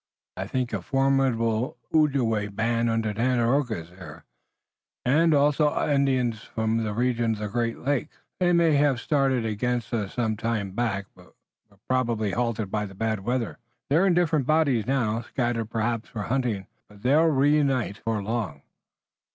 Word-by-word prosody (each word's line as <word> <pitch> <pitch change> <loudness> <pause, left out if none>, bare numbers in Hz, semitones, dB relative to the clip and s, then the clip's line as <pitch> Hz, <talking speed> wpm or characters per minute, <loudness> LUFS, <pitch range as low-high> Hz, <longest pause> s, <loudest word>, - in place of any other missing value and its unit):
I - - -4
think 125 -2 -2
a - - -2
formidable 130 -3 +1 0.2
Ojibway 130 -9 +2
band 115 +2 +1
under 115 -2 0
Tandakora 120 -1 +1
is 80 - -18
there, 85 -3 -12 0.8
and 160 +6 +4
also 150 +1 +3
other 150 - 0
Indians 130 -5 +1
from 110 +1 -2
the 110 - -2
region 120 -1 +1
of - - -5
the 105 0 -3
Great 115 +2 -1
Lakes. 145 +3 -2 0.2
They 180 -1 +3
may 170 -2 +4
have 140 -3 +2
started 135 -4 +1
against 120 +1 -2
us 105 -4 -2
some 110 -3 0
time 110 -3 -2
back, 100 -2 -1
but - - -19 0.3
were 100 - -25
probably 115 -5 0
halted 115 -3 -2
by 105 -1 -1
the 95 - -13
bad 110 +1 -1
weather. 120 +3 -2 0.3
They're 170 +7 +4
in 180 - +3
different 155 -6 +1
bodies 145 -9 +2
now, 120 -4 0
scattered 120 -2 -2
perhaps 115 0 -2
for 105 -3 -5
hunting, 120 -6 -1 0.2
but 105 -1 -17
they'll 145 +6 +4
reunite 140 -6 +2
before 110 -2 -2
long." 100 -10 -3
120 Hz, 160 wpm, -26 LUFS, 110-135 Hz, 0.8 s, and